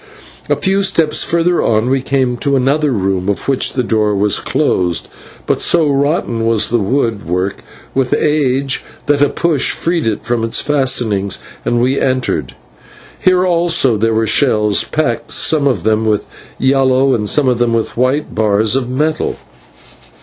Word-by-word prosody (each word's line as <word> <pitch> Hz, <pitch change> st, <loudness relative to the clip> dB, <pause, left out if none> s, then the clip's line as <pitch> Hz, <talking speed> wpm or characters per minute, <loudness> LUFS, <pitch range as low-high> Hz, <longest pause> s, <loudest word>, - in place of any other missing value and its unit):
A -, -, +3 dB
few 195 Hz, +1 st, 0 dB
steps 165 Hz, -5 st, +1 dB
further 170 Hz, +1 st, +1 dB
on 110 Hz, +1 st, +1 dB
we 135 Hz, +1 st, +1 dB
came 130 Hz, -2 st, 0 dB
to 140 Hz, +2 st, 0 dB
another 140 Hz, +3 st, +1 dB
room 95 Hz, -3 st, -1 dB
of 100 Hz, -, -3 dB
which 135 Hz, -2 st, +1 dB
the 125 Hz, -, -1 dB
door 110 Hz, -2 st, 0 dB
was 100 Hz, +1 st, +1 dB
closed, 90 Hz, -, -1 dB, 0.4 s
but -, -, -1 dB
so 165 Hz, -3 st, +3 dB
rotten 140 Hz, -5 st, 0 dB
was 115 Hz, -2 st, +2 dB
the 120 Hz, -, +1 dB
woodwork 100 Hz, -, -1 dB, 0.4 s
with 130 Hz, -2 st, -1 dB
age 140 Hz, -3 st, 0 dB, 0.2 s
that 145 Hz, -1 st, +1 dB
a 145 Hz, -, +4 dB
push 160 Hz, -6 st, +1 dB
freed 165 Hz, -5 st, -1 dB
it 110 Hz, -, -2 dB
from 120 Hz, -1 st, -1 dB
its 115 Hz, -, 0 dB
fastenings, 125 Hz, -9 st, 0 dB, 0.3 s
and 120 Hz, -, 0 dB
we 130 Hz, +3 st, +1 dB
entered. 130 Hz, -, -1 dB, 0.6 s
Here 185 Hz, 0 st, +2 dB
also 170 Hz, -8 st, +2 dB
there 110 Hz, +1 st, 0 dB
were 110 Hz, 0 st, +1 dB
shelves, 105 Hz, -3 st, +2 dB
packed 120 Hz, -7 st, -2 dB
some 150 Hz, -3 st, +1 dB
of 130 Hz, -, 0 dB
them 110 Hz, 0 st, +1 dB
with 105 Hz, -1 st, 0 dB, 0.3 s
yellow 130 Hz, 0 st, +2 dB
and 105 Hz, -4 st, -1 dB
some 150 Hz, -, +2 dB
with 120 Hz, -2 st, 0 dB
white 130 Hz, +5 st, 0 dB
bars 110 Hz, +1 st, +1 dB
of 130 Hz, -2 st, -1 dB
metal. 155 Hz, +4 st, -1 dB
130 Hz, 155 wpm, -15 LUFS, 110-145 Hz, 0.6 s, a